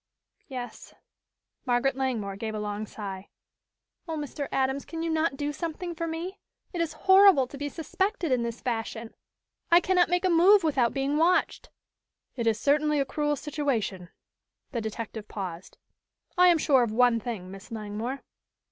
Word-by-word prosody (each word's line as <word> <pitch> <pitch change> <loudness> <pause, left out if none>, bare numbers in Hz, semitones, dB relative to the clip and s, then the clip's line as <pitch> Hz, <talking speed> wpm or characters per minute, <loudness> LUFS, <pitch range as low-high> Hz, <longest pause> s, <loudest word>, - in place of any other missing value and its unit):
"Yes." 250 -3 -8 0.7
Margaret 250 +1 +1
Langmore 235 -7 -2
gave 220 +2 -4
a - - -3
long 210 0 -4
sigh. 195 -2 -7 0.8
"Oh, 325 -1 -3
Mr. 290 -1 -4
Adams, 265 +1 0
can 330 0 -6
you 330 - -1
not 315 -3 0
do 290 +1 -2
something 335 +2 -4
for 335 0 -3
me? 340 +4 -5 0.3
It 345 - -1
is 330 -2 -1
horrible 380 -7 +7
to 260 - -11
be 290 0 -2
suspected 350 +1 -2
in 250 -2 +2
this 235 0 -4
fashion. 225 -2 -4 0.6
I 340 -1 +7
cannot 360 -1 +2
make 355 +1 +1
a - - +3
move 370 +4 +6
without 270 -7 +2
being 275 +2 -1
watched!" 340 +3 +2 0.7
"It 235 -3 -2
is 220 -1 +2
certainly 295 +2 +2
a 275 - +1
cruel 295 +2 -1
situation." 260 - -2 0.6
The 235 -4 -2
detective 220 0 -6
paused. 185 -4 -7 0.6
"I 360 0 +6
am 345 -2 +6
sure 275 -4 +4
of 235 -3 0
one 240 0 +4
thing, 210 -6 -6
Miss 195 +3 -11
Langmore." 225 +4 -5
270 Hz, 165 wpm, -27 LUFS, 225-325 Hz, 0.8 s, horrible